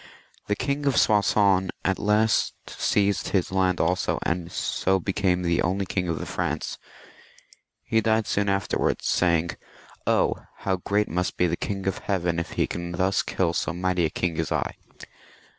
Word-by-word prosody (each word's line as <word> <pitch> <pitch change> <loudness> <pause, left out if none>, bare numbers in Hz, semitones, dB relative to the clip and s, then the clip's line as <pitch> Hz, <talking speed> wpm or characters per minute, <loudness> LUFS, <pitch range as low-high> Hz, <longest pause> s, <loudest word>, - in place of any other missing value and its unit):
The 105 - +1
King 140 +3 -1
of 135 - +2
Soissons 100 -3 +3 0.2
at 95 0 +1
last 105 +1 +2
seized 100 -1 +1
his 95 -3 0
land 95 -2 +1
also, 90 +3 +1
and 85 +1 -2
so 95 0 0
became 95 -1 0
the 85 -1 +1
only 95 +3 0
king 90 -1 -2
of 85 -2 -1
the - - -4
Franks. - - -3 1.0
He 110 - +1
died 110 0 +2
soon 100 0 0
after, 100 0 0 0.2
saying, 85 -1 +2 0.3
" - - -25
Oh! - - +2 0.3
how 95 -1 +1
great 100 +3 0
must 90 +2 -2
be 90 - +3
the 85 - +1
King 95 -2 -4
of 95 - -1
Heaven, 85 -4 -1
if 85 - -5
He - - +1
can 85 0 -5
thus 95 +2 +1
kill 85 -3 0
so 75 - -1
mighty 90 -1 0
a - - +1
king 85 0 -2
as 80 - -1
I." - - -1
95 Hz, 175 wpm, -25 LUFS, 85-100 Hz, 1.0 s, Soissons